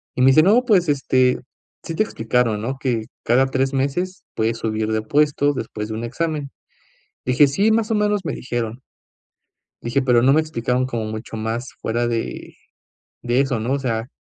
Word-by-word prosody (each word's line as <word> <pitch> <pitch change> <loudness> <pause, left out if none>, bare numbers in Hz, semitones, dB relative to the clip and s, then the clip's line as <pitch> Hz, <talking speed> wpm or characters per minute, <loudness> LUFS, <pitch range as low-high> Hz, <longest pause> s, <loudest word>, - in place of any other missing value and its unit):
y 125 - -1
me 130 - +6
dice: 145 +4 +6
“No, 220 +7 +5
pues, 185 -8 +3
este, 130 -2 +2 0.4
sí 165 - -5
te 215 - +3
explicaron, 115 - 0
¿no?, 130 +4 -3
que 120 -5 -1 0.2
cada 125 +3 +3
3 135 +1 0
meses 175 +8 -2
puedes 115 +1 0
subir 110 -1 -2
de 110 0 0
puesto 145 +4 +2
después 110 -4 -5
de 110 - -4
un 115 - -4
examen”. 150 +3 -3 0.8
Dije: 130 +3 +5
“Sí, 200 +11 +2
más 225 0 +1
o - - +2
menos 210 -1 +1
me - - -2
dijeron" 120 -1 -4 1.0
dije: 120 +4 0
"Pero 125 -3 +3
no 135 +2 +5
me 155 - +4
explicaron 125 -4 -1
como 115 -4 -3
mucho 110 +1 -6
más 115 +3 -3
fuera 120 +1 0
de 115 -1 -4 0.7
de 120 +1 +1
eso, 135 -5 -1
¿no? 120 +5 -1
O 140 - 0
sea, 115 -3 -2
130 Hz, 185 wpm, -21 LUFS, 115-145 Hz, 1.0 s, me